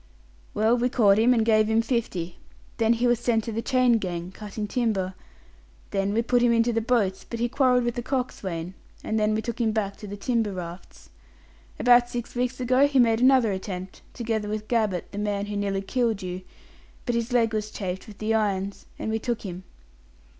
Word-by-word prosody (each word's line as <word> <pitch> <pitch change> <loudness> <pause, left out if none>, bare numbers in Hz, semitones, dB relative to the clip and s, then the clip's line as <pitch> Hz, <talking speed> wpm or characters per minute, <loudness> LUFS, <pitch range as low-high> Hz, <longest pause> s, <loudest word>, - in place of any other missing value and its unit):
"Well, 220 +3 +3
we 245 +1 +2
caught 215 -5 +4
him, 235 +3 +5
and 230 -3 +3
gave 215 -1 +4
him 220 +1 +2
fifty. 215 -8 -2 0.4
Then 225 0 +3
he 235 +1 0
was 240 -1 +3
sent 235 -2 +1
to 230 - -4
the 225 +1 -2
chain 250 -1 +3
gang, 175 -2 -4
cutting 210 +1 -6
timber. 205 -6 -1 0.8
Then 195 0 0
we 225 +3 +1
put 245 +1 +2
him 240 -1 +4
into 230 +1 +2
the 230 - +1
boats, 220 -5 +1
but 235 - -6
he 240 - +1
quarrelled 250 -1 +3
with 240 0 0
the 240 - -3
coxswain, 190 -10 -3 0.3
and 220 - -1
then 215 0 +2
we 220 - -2
took 235 0 -4
him 225 -2 +2
back 205 -2 -2
to 210 - -9
the 205 +1 -6
timber 225 -1 0
rafts. 175 0 -9 0.7
About 245 0 +5
six 240 -1 -5
weeks 250 +1 -2
ago 255 +3 +4
he 280 -1 0
made 230 -2 +4
another 255 -4 +5
attempt 190 -1 -6
together 220 -3 -2
with 215 0 -4
Gabbett, 215 -7 0
the 205 - -5
man 205 -1 -1
who 205 0 -5
nearly 200 -1 -1
killed 225 -2 0
you 180 0 -5 0.6
but 245 - 0
his 235 +1 -1
leg 230 -2 +2
was 215 0 -2
chafed 190 -3 -5
with 210 -2 -12
the 215 +1 -1
irons, 200 -2 -1
and 220 - -3
we 220 - 0
took 240 0 -3
him. 185 -2 -7
220 Hz, 205 wpm, -25 LUFS, 200-240 Hz, 0.8 s, him